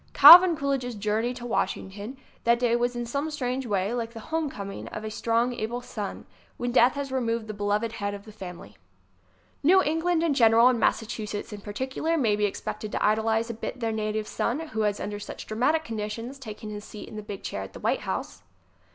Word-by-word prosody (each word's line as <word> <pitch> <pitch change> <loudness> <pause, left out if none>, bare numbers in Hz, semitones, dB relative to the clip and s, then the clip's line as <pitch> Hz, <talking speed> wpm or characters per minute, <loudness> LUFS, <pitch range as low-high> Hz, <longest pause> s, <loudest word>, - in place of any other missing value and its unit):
Calvin 350 -1 +10
Coolidge's 270 -4 -1
journey 215 +3 0
to 245 -1 -7
Washington 210 +1 -3 0.3
that 235 0 +4
day 240 -1 +2
was 240 +1 0
in 240 0 -3
some 280 +6 -2
strange 260 -3 -3
way 200 +1 0
like 230 -1 -3
the 225 - -8
home 320 -2 +1
coming 200 -5 -7
of 215 - -7
a 215 - -4
strong, 230 +3 +1
able 235 +1 -3
son 215 -4 -6 0.3
when 245 0 -2
death 245 0 +5
has 280 -1 -4
removed 230 -3 -1
the 215 - -6
beloved 205 +2 -1
head 205 -2 -3
of 200 +1 -11
the 215 - -11
family. 180 - -10 0.9
New 365 +6 +6
England 325 +2 +1
in 325 -3 +2
general 230 -1 +6
and 245 -2 +1
Massachusetts 215 -2 -1
in 205 - -8
particular 260 +10 -2
may 225 -8 +2
be 210 0 +1
expected 205 +1 -4
to - - 0
idolize 220 +2 +1
a - - -5
bit 230 +3 -6
their 230 -2 -1
na 215 -1 -1
tive 215 0 -2
son 305 +7 -2
who 220 - -2
has 205 -1 0
under 205 0 -4
such 205 - -8
dramatic 275 +9 +1
conditions 230 +2 -5
taken 215 -3 -8
his 210 0 -6
seat 210 - -9
in - - -10
the 215 - -5
big 205 -2 -8
chair 100 - -4
at 95 0 -8
the - - -9
White - - 0
House. 95 0 -4
230 Hz, 210 wpm, -26 LUFS, 210-255 Hz, 0.9 s, Calvin